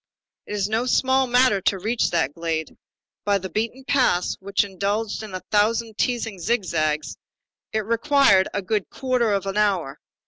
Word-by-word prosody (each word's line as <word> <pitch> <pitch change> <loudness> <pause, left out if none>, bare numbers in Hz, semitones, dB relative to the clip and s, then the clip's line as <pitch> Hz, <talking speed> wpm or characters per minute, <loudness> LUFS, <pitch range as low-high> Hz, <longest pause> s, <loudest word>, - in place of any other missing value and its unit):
It - - -6
was 200 -2 0
no 225 +4 -1
small 260 +1 +2
matter 245 -5 +3
to 195 - +1
reach 220 +5 0
that 160 -5 0
glade. 165 -1 -3 0.5
By 205 -1 +2
the 190 -1 -7
beaten 230 +7 -3
paths, 250 -11 +2
which 200 +1 0
indulge 205 +3 -2
in 210 -4 -7
a 185 - -5
thousand 220 +1 +1
teasing 225 -5 -1
zigzags, 155 - -1 0.5
it 220 -1 -1
required 230 -4 +4
a 200 - -3
good 205 0 -1
quarter 250 -4 0
of 195 -1 0
an 195 +1 -3
hour. 190 -9 0
205 Hz, 165 wpm, -23 LUFS, 190-230 Hz, 0.5 s, required